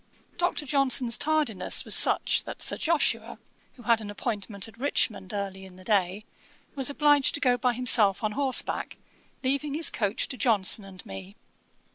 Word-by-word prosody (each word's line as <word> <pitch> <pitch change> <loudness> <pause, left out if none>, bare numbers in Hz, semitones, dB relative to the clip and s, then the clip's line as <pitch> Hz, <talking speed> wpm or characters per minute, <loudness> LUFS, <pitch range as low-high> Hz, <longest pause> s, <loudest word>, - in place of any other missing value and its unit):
Dr. 350 -4 -1
Johnson's 265 -3 +1
tardiness 300 -9 0
was - - +5
such, - - +4
that - - -8
Sir - - +1
Joshua, 330 -1 -1 0.4
who 245 - -15
had 230 -1 +2
an 210 - -7
appointment 205 -1 -4
at 225 +1 -17
Richmond, 230 -8 -1
early 195 -2 -5
in 190 -1 -13
the 185 - -14
day, 195 0 0 0.5
was 270 -2 0
obliged 290 -1 +3
to - - -1
go 250 -3 +3
by 245 0 0
himself 225 -6 +2
on 215 - 0
horseback, 265 +3 -1 0.5
leaving 280 +2 -1
his 320 0 +1
coach 205 -1 -1
to 255 - -6
Johnson 210 -4 +1
and 190 -2 -12
me. 95 0 -10
230 Hz, 165 wpm, -27 LUFS, 200-275 Hz, 0.5 s, was